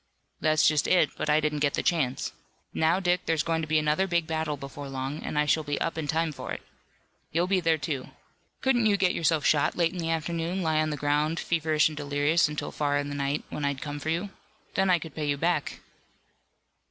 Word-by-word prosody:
"That's 155 -1 +3
just 155 -2 +2
it, 175 -5 +4
but - - -3
I 150 +1 +5
didn't 150 -1 -1
get 145 -1 +1
the - - -1
chance. 135 -7 0 0.4
Now, 160 +3 +2
Dick, 180 -2 0
there's 160 -3 +2
going 165 -1 0
to 160 - -4
be 155 0 +2
another 155 +5 +2
big 170 -2 +1
battle 160 -2 -2
before 140 +1 -8
long, 135 +2 -4
and - - -4
I 150 - +3
shall 155 +1 +2
be 145 -1 -2
up 165 - -1
in 160 -2 -3
time 160 +2 0
for 145 - -7
it. - - -5 0.7
You'll 170 +2 +2
be 190 0 +2
there, 165 -2 +2
too. 140 -4 -4 0.5
Couldn't 240 -4 +3
you 205 -1 +3
get 185 -2 +2
yourself 160 -2 +1
shot 145 -2 +3
late 170 -2 +2
in 185 - -6
the 165 -1 -2
afternoon, 165 +3 -1
lie 160 -1 +2
on 155 - 0
the 150 - -3
ground, 150 +3 +1
feverish 155 -2 +2
and 155 - -6
delirious 145 +3 +2
until 150 0 -4
far 145 -1 0
in 145 0 -2
the - - -4
night, 140 +1 -1
when 150 - -4
I'd 140 -1 -1
come 145 -1 -5
for 155 - -4
you. 175 +5 -1 0.4
Then 190 -1 +2
I 180 - +5
could 160 -3 -8
pay 150 -2 -3
you 140 - +1
back." 165 -1 -1
155 Hz, 230 wpm, -27 LUFS, 145-165 Hz, 0.7 s, I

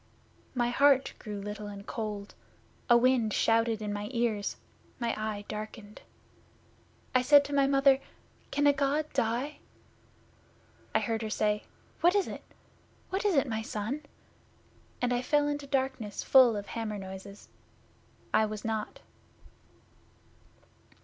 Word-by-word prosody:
My 240 -1 +1
heart 275 0 +4
grew 210 -2 -6
little 210 +1 -6
and 200 -1 -8
cold; 210 -3 -5 0.6
a 240 - +8
wind 240 -3 +3
shouted 225 -1 +2
in 205 -1 -2
my 205 0 -4
ears; 230 -4 -1 0.4
my 235 -2 -1
eye 215 -1 -4
darkened. 215 0 -7 1.1
I 255 - +4
said 285 +2 +6
to 285 - -6
my 275 -1 +4
Mother, 275 -1 +5 0.5
"Can 290 - +1
a 285 - +6
God 285 +2 +1
die?" 260 +4 -1 1.4
I - - +6
heard 225 -1 -1
her 220 - -3
say, 210 0 0 0.3
"What 350 +2 +4
is 405 - +2
it? - - -7 0.7
What 385 +2 -1
is 400 -4 +3
it, 275 - +4
my 220 -2 -2
son?" 220 +6 -4 1.0
and 245 0 +2
I 245 - +1
fell 290 +2 +2
into 290 -1 -3
darkness 260 -6 -2
full 255 -4 +6
of 205 -1 -4
hammer 220 -2 -4
noises. 190 +1 -9 0.8
I 220 - +4
was 215 0 -6
not. 220 - -3
230 Hz, 135 wpm, -30 LUFS, 210-275 Hz, 1.4 s, a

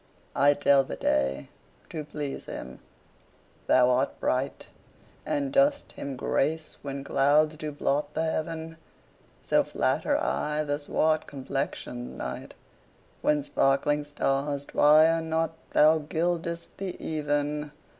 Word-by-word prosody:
I 145 +1 +5
tell 140 -1 +4
the - - -6
day, 65 0 0 0.4
to 155 -2 -4
please 150 -2 -5
him - - -8 0.9
thou 125 0 +5
art 130 +2 0
bright, 130 +2 -1 0.6
And 285 -2 -1
dost 280 +1 +3
him 140 -1 -6
grace 155 +5 -1
when 140 -1 -5
clouds 150 +3 +3
do 155 0 -5
blot 145 0 -1
the 160 - 0
heaven: 160 0 -3 0.7
So - - +3
flatter - - 0
I 150 0 -1
the 145 -1 -2
swart 155 +2 +1
complexion'd 65 - -4
night, - - -6 0.7
When 150 -1 +2
sparkling 145 +2 +1
stars 140 0 -1
twire 155 +3 +5
not 160 0 -1 0.2
thou 155 +1 +5
gild'st 170 +2 -2
the 190 -2 -5
even. 150 -1 -1
150 Hz, 120 wpm, -27 LUFS, 140-160 Hz, 0.9 s, I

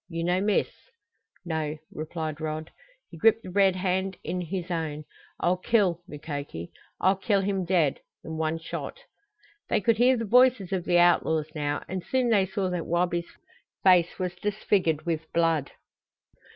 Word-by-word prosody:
You 165 -1 -3
no 180 +2 +1
miss?" 205 0 +1 0.7
"No," 160 -2 -2
replied 155 0 -5
Rod. 155 0 -4 0.4
He 165 - -10
gripped 225 +4 +4
the 185 - -8
red 195 -1 +4
hand 190 0 -1
in 180 - -3
his 180 +1 -4
own. 155 -3 -3 0.4
"I'll 180 +1 +2
kill, 185 -4 +2
Mukoki. 145 - -6 0.3
I'll 190 +1 +3
kill 200 0 +1
him 195 -1 -1
dead 170 -6 +2 0.2
in 160 - -6
one 160 0 0
shot!" 165 0 -6 0.7
They - - +2
could 225 +2 +2
hear 250 +1 +5
the 230 - -2
voices 245 -4 +4
of 185 -2 -1
the 175 - +3
outlaws 160 -3 +3
now, 145 -2 -2
and 185 0 -4
soon 255 +2 +1
they 200 -4 +3
saw 190 0 -2
that 175 -2 -3
Wabi's 175 0 0 0.5
face 180 -3 +4
was 180 -2 -2
disfigured 195 -6 0
with 160 -2 -3
blood. 165 -4 +2
175 Hz, 160 wpm, -27 LUFS, 160-195 Hz, 0.7 s, hear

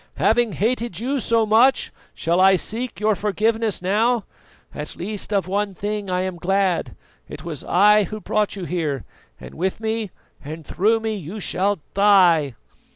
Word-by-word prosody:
Having 220 +2 +2
hated 225 - -1
you 265 +4 -1
so 230 -1 +2
much, 235 +5 +3 0.2
shall 170 +2 +1
I 190 0 +6
seek 230 +6 -4
your 215 +1 +2
forgiveness 215 0 0
now? 215 +3 +1 0.5
At 150 +1 -6
least 205 +3 -5
of 200 -3 0
one 200 +1 -1
thing 205 +1 -4
I 180 0 0
am 185 -1 -3
glad 190 -1 0 0.3
it 150 +1 -9
was 160 -5 -6
I 210 +3 +4
who 215 +4 -7
brought 210 0 -1
you 190 -3 -5
here, 155 -8 -2 0.3
and - - -11
with 190 +5 -2
me 220 -1 -2 0.3
and 155 +2 -8
through 220 +9 +1
me 220 0 -2
you 195 +2 -7
shall 195 -1 0
die." 180 - +4
200 Hz, 160 wpm, -22 LUFS, 180-220 Hz, 0.5 s, I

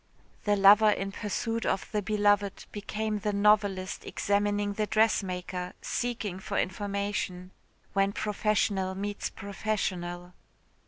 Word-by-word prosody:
The 205 -1 +3
lover 205 +2 +7
in 195 -1 0
pursuit 225 +3 -2
of 190 - -1
the 210 - 0
beloved 205 -1 +1
became 210 +1 -3
the 210 +1 -1
novelist 200 -2 +2
examining 205 0 0
the 210 +1 -1
dressmaker, 180 -5 0
seeking 225 -6 -3
for - - -4
information. 200 -2 -2 0.4
When 195 0 +2
professional 205 -2 0
meets 205 +1 -3
professional. 180 -4 -3
205 Hz, 110 wpm, -29 LUFS, 190-210 Hz, 0.4 s, lover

